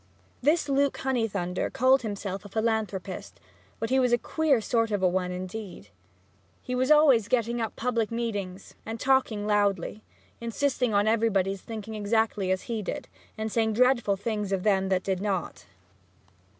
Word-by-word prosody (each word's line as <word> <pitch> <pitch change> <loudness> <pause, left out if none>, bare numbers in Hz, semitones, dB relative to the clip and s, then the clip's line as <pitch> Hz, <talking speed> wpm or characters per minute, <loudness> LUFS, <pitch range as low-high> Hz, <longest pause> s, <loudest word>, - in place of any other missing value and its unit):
This 300 +3 +2
Luke 280 0 +1
Honeythunder 210 -9 -1
called 260 +2 +4
himself 200 -3 -4
a 205 - -10
philanthropist, 215 -3 -2 0.4
but 225 +2 -3
he 265 - +4
was 250 -2 +2
a 240 - +5
queer 300 0 +1
sort 230 +1 0
of 205 -3 -1
one, 180 0 +1
indeed. 185 - -7 0.7
He 250 - -4
was 255 +1 +1
always 285 -8 +6
getting 235 -1 0
up 225 - -3
public 230 -3 0
meetings 205 -5 -4
and 225 +1 -6
talking 255 -6 +2
loudly, 205 -1 0 0.4
insisting 250 +1 0
on 205 0 +2
everybody's 200 -4 +1
thinking 220 -1 -7
exactly 210 -2 0
as 185 0 0
he 230 -3 -3
did, 265 +6 -5 0.3
and 220 0 -3
saying 220 -1 +1
dreadful 240 -3 +3
things 210 -1 -3
of 190 -2 0
them 195 -2 +2
if - - -3
they 190 -1 +2
did 185 - -5
not. 195 - -3
220 Hz, 160 wpm, -27 LUFS, 195-240 Hz, 0.7 s, always